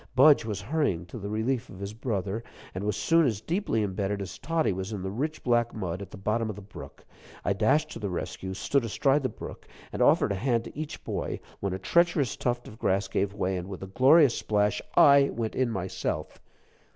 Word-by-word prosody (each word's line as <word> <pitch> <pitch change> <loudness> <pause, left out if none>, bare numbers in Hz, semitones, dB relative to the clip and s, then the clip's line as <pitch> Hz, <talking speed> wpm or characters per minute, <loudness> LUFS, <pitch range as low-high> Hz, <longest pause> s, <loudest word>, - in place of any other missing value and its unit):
Budge 140 -1 +6
was 105 -3 -3
hurrying 105 - 0
to 90 +7 -8
the 100 0 -5
relief 115 +4 -1
of 95 - -11
his 100 +1 -5
brother, 110 -2 -3 0.3
and 90 - -4
was 105 -1 0
soon 165 0 +4
as 110 -5 -1
deeply 160 - -1
imbedded 100 0 -2
as 100 - -6
Toddie 160 - 0
was 95 +3 -4
in 100 -4 -4
the 95 - -3
rich 150 +9 -3
black 120 -1 +2
mud, 95 -3 -3
at 100 - -7
the - - -10
bottom 110 +3 -1
of 105 - -4
the 105 - -9
brook. 95 - -11 0.4
I 100 - +2
dashed 145 +10 +2
to - - -7
the 105 -2 -3
rescue, 95 +1 -4
stood 140 +6 +1
astride 135 +6 +2
the 130 - -1
brook, - - -9 0.3
and - - -3
offered - - +4
a 95 - -2
hand 120 -3 +1
to - - -10
each 155 +1 -6
boy, - - -3 0.2
when 100 -2 -2
a - - -2
treacherous 170 - +2
tuft 120 -1 -2
of 110 - -12
grass 95 +1 +1
gave 100 +1 -1
way, 95 -2 -1
and, 90 +1 -6
with 95 -1 -7
a - - -4
glorious 130 - +5
splash, 105 -1 +1 0.2
I 140 -1 +7
went 115 -2 -3
in 130 -2 +1
myself. 95 -4 -3
110 Hz, 220 wpm, -28 LUFS, 95-130 Hz, 0.4 s, I